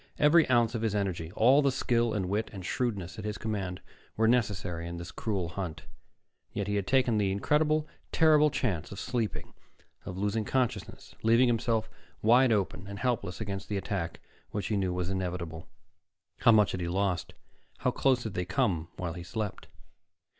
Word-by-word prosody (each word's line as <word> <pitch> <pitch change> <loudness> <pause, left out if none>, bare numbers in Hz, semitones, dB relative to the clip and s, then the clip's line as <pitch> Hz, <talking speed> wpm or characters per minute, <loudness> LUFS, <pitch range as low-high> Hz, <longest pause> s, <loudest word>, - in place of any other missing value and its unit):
Every 150 +2 +5
ounce 120 -2 +3
of 115 - -2
his 110 -2 0
energy, 90 -5 -2
all 130 +6 +5
the 140 -1 +3
skill 120 -3 +1
and 95 -3 -1
wit 105 +4 -1
and 95 -3 -8
shrewdness 105 -3 -2
at - - -6
his 105 -1 -3
command 95 -5 -3 0.4
were 110 +1 +3
necessary 100 -8 0
in 85 0 -5
this 85 +2 -7
cruel 95 -6 -2
hunt; 85 -3 -5 0.7
yet 100 - -2
he 105 - 0
had 100 -2 -1
taken 125 -4 +3
the 100 -2 +1
incredibly 150 +9 +2 0.3
terrible 155 -2 +5
chance 115 - -2
of 100 - -6
sleeping, 115 -4 -3 0.5
of 90 - -6
losing 105 +3 0
consciousness, 130 +1 -2
leaving 115 +3 +5
himself 115 -2 +1 0.4
wide 120 +3 +6
open 100 -2 0
and 100 0 -7
helpless 100 -6 -1
against 100 -2 -4
the 105 - -1
attack 95 -3 -3 0.3
which 100 -2 -3
he 110 - +1
knew 95 -2 0
was 90 +1 -2
inevitable. 90 -3 -4 0.7
How 120 - +6
much 105 -4 +5
had 95 - -3
he 85 - -2
lost? 90 -2 -1 0.4
How - - +1
close 130 -3 +2
had 110 - -4
they 90 - -1
come 95 -5 0
while 85 -2 -3
he 85 - -7
slept? 100 +4 -5
105 Hz, 180 wpm, -29 LUFS, 90-120 Hz, 0.7 s, wide